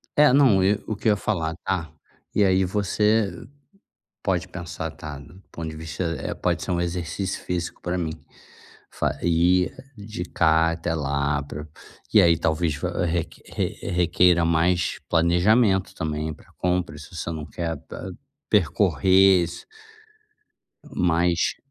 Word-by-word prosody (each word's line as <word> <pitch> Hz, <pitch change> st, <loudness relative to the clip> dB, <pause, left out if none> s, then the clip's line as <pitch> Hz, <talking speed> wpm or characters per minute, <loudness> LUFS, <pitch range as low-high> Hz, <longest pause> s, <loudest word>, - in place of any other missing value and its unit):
É, 150 Hz, -3 st, +6 dB
não, 130 Hz, -9 st, +5 dB
eh 100 Hz, +2 st, +3 dB
o -, -, -3 dB
que 105 Hz, -, -3 dB
eu -, -, +6 dB
ia 105 Hz, -, +3 dB
falar, 85 Hz, -6 st, -2 dB
ah. 90 Hz, -5 st, -1 dB, 0.5 s
E 105 Hz, -, +4 dB
aí 95 Hz, -1 st, +3 dB
você 105 Hz, 0 st, 0 dB, 0.8 s
pode 90 Hz, -2 st, 0 dB
pensar, 85 Hz, -3 st, -6 dB
tá, 75 Hz, -3 st, -8 dB
do 85 Hz, +7 st, -15 dB
ponto 80 Hz, -1 st, -5 dB
de 80 Hz, -, -8 dB
vista, 80 Hz, +3 st, -5 dB, 0.2 s
eh, -, -, -3 dB
pode -, -, -1 dB
ser -, -, -3 dB
um 85 Hz, -, 0 dB
exercício 85 Hz, +2 st, -3 dB
físico 90 Hz, -1 st, -4 dB
pra 90 Hz, +1 st, -2 dB
mim. 80 Hz, -3 st, -2 dB, 0.8 s
Fa -, -, -2 dB
ir, 90 Hz, +2 st, +3 dB, 0.2 s
de 100 Hz, -3 st, -6 dB
cá 80 Hz, -1 st, +3 dB
até 80 Hz, 0 st, -2 dB
lá 70 Hz, 0 st, 0 dB
pra 75 Hz, +2 st, -8 dB, 0.5 s
e -, -, +8 dB
aí 85 Hz, -1 st, +5 dB
talvez 80 Hz, -1 st, 0 dB
va 90 Hz, +3 st, -2 dB
re 85 Hz, -1 st, 0 dB, 0.2 s
re -, -, -3 dB, 0.2 s
requeira 85 Hz, -1 st, +3 dB
mais 85 Hz, +2 st, +1 dB
planejamento 95 Hz, +4 st, +3 dB
também 75 Hz, 0 st, -3 dB
pra -, -, -19 dB
compra, 90 Hz, -3 st, -1 dB
se 75 Hz, +4 st, -12 dB
você 85 Hz, -, -4 dB
não 80 Hz, -2 st, -5 dB
quer 85 Hz, -1 st, -4 dB
pa 95 Hz, -, -7 dB, 0.4 s
percorrer 95 Hz, -1 st, +4 dB
isso. 85 Hz, -, -7 dB, 1.3 s
Mas 85 Hz, 0 st, +1 dB
85 Hz, 150 wpm, -24 LUFS, 80-95 Hz, 1.3 s, e